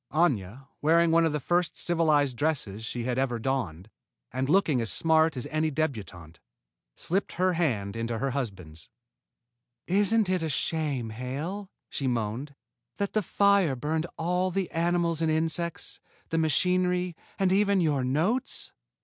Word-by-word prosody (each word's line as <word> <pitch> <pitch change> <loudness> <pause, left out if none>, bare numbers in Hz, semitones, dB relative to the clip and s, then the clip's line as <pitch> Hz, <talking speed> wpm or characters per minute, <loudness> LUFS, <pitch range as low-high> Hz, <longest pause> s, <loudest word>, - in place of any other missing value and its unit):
Aña, 135 - 0
wearing 165 +2 +4
one 165 0 +4
of - - -1
the 150 - -1
first 175 +5 0
civilized 155 -6 +2
dresses 120 -8 -2
she 120 +1 -4
had 125 +1 -1
ever 130 -3 0
donned, 110 -8 -2 0.5
and 130 +1 -1
looking 155 -8 +3
as 115 - -1
smart 160 -2 +3
as 125 - -4
any 155 0 +1
débutante, 100 - -4 0.6
slipped 190 +3 -1
her 185 +2 +2
little 180 - -1
hand 105 -9 -1
into 115 0 -2
her 135 +4 -1
husband's. 95 - -5 1.0
"Isn't 205 +3 +3
it 185 -1 +1
a 160 - -1
shame, 140 -5 -1
Hale," 145 - -5 0.2
she 135 - -3
moaned, 120 +4 -2 0.4
"that 200 -1 -2
the 215 - +2
fire 200 -5 +3
burned 155 +6 -2
all 180 +3 0
the 185 -1 -2
animals 170 -1 +1
and 160 - +2
insects, 165 +1 -1 0.3
the 165 - 0
machinery, 180 +2 +1 0.2
and 190 -1 +2
even 200 0 +3
your 150 -6 +1
notes?" 175 - 0
155 Hz, 150 wpm, -28 LUFS, 125-175 Hz, 1.0 s, wearing